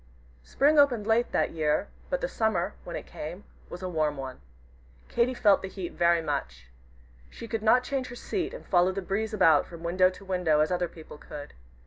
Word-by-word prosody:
Spring 295 - +3
opened 245 -7 +4
late 225 +2 +2
that - - +1
year, 155 +4 0 0.2
but - - -1
the - - 0
Summer, 210 - 0
when 170 - -6
it - - -6
came, 170 +6 -7 0.3
was 175 +1 -8
a - - -2
warm 155 -4 0
one. 130 - -7 0.7
Katy 240 +2 +1
felt 205 -4 +4
the 190 - -4
heat 190 -2 -6
very 170 -1 +3
much. 60 - -4 0.6
She 230 - -9
could 225 0 -3
not 235 +3 +4
change 265 -1 -2
her 240 - -8
seat 360 +8 -3
and - - -9
follow 180 0 +3
the 195 0 -4
breeze 210 +4 -2
about 165 -8 +4
from 170 -1 -11
window 185 +2 +3
to 190 +1 -12
window 180 -5 +1
as 155 - +1
other 180 -1 0
people 160 -2 -12
could. 145 0 -9
185 Hz, 200 wpm, -28 LUFS, 160-225 Hz, 0.7 s, opened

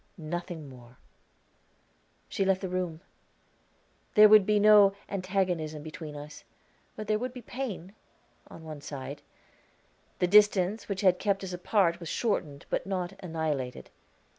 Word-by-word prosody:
"Nothing 170 -1 -5
more." 125 -2 -15 1.3
She - - -1
left 190 -1 +1
the 190 - -4
room. 180 -3 -3 1.1
There 215 -1 +9
would 210 -2 +6
be 210 -1 +3
no 205 -1 +6
antagonism 185 -6 -2
between 155 -1 -8
us; 145 +1 -10 0.5
but 215 - -6
there 215 0 0
would 250 +1 -4
be 250 -2 -9
pain 215 -8 -6 0.5
on 160 - -12
one 155 -2 -8
side. 140 0 -7 1.0
The - - +2
distance 205 +1 +4
which 195 -1 -2
had 185 -3 +4
kept 200 -1 0
us 185 -1 -5
apart 180 -1 +1
was 170 -3 -7
shortened, 155 -11 -2
but - - -1
not 185 -1 -3
annihilated. 155 -7 -4
180 Hz, 140 wpm, -29 LUFS, 155-205 Hz, 1.3 s, There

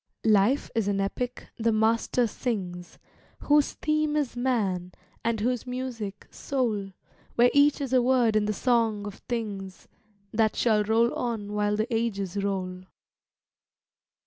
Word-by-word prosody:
Life 220 +5 +3
is 225 -3 0
an 200 -1 0
epic 245 +6 -3
the 230 -1 +1
Master 225 +3 +2
sings, 185 -7 -4 0.4
Whose 295 0 +3
theme 305 -1 0
is 280 -5 -1
Man, 200 -8 -1 0.3
and 230 -1 0
whose 245 +2 -1
music, 245 -5 -5
Soul, 215 -8 -2 0.4
Where 245 +1 +5
each 285 +1 +4
is 270 -2 -3
a 255 - +5
word 245 -3 +3
in 215 -1 +3
the 210 - 0
Song 225 -3 +1
of 205 -1 -8
Things, 200 -5 -4 0.5
That 220 -1 +2
shall 215 -3 +3
roll 225 +3 +2
on 220 -4 -3
while 210 0 +1
the 220 +3 -1
ages 200 -5 -2
roll. 185 -2 -3
225 Hz, 140 wpm, -27 LUFS, 205-245 Hz, 0.5 s, Where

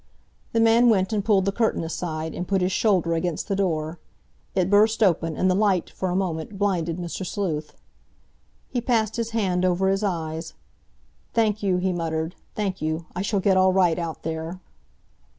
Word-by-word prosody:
The 230 - +1
man 230 +2 +5
went 195 -1 +2
and 205 -2 0
pulled 195 -3 +3
the 195 - +1
curtain 225 -3 0
aside, 160 -1 -4
and 180 - -4
put 195 -1 +1
his 185 - +1
shoulder 185 -5 +2
against 165 0 -2
the 200 - 0
door. 165 -4 -1 0.6
It 185 -2 +2
burst 215 +3 +4
open, 165 -4 +1
and 185 - +2
the 185 - +4
light, 195 -3 +1
for 185 - -3
a 180 - -1
moment, 185 0 -2
blinded 175 -5 0
Mr. 175 +1 -5
Sleuth. 165 -5 -3 0.9
He 245 - -2
passed 225 -2 +1
his 230 -1 -1
hand 190 -6 0
over 185 +1 +2
his 195 +2 0
eyes. 165 -4 -3 0.8
"Thank 215 -2 +2
you," 190 -3 +1
he 185 0 0
muttered, 160 -1 -2 0.2
"thank 195 -3 -2
you. 155 +1 -2
I 180 - -2
shall 200 0 0
get 190 0 +3
all 185 0 +4
right 180 -3 +3
out 165 -2 -5
there." 160 +3 -4
185 Hz, 185 wpm, -24 LUFS, 165-205 Hz, 0.9 s, man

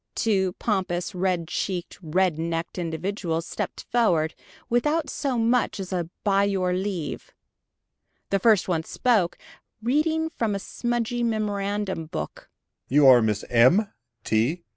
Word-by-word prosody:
Two 190 -5 +1
pompous, 185 -4 -2
red 180 -2 0
cheeked, 180 0 -3
red 175 0 +1
necked 165 +2 -3
individuals 165 0 -2
stepped - - -5
forward, 170 -10 +2 0.3
without 295 +5 +1
so 270 -4 -1
much 230 -1 +1
as 190 -1 -5
a 175 -2 -2
"by 200 -1 +3
your 190 -3 +1
leave!" 185 -4 -3 1.0
The 195 - +3
first 215 -2 +4
one 170 -3 +1
spoke, 210 -3 +1 0.4
reading 315 +7 +1
from 225 -9 -1
a - - -2
smudgy 240 +3 -2
memorandum 205 -5 -1
book. 160 0 -6
195 Hz, 110 wpm, -25 LUFS, 175-230 Hz, 1.0 s, first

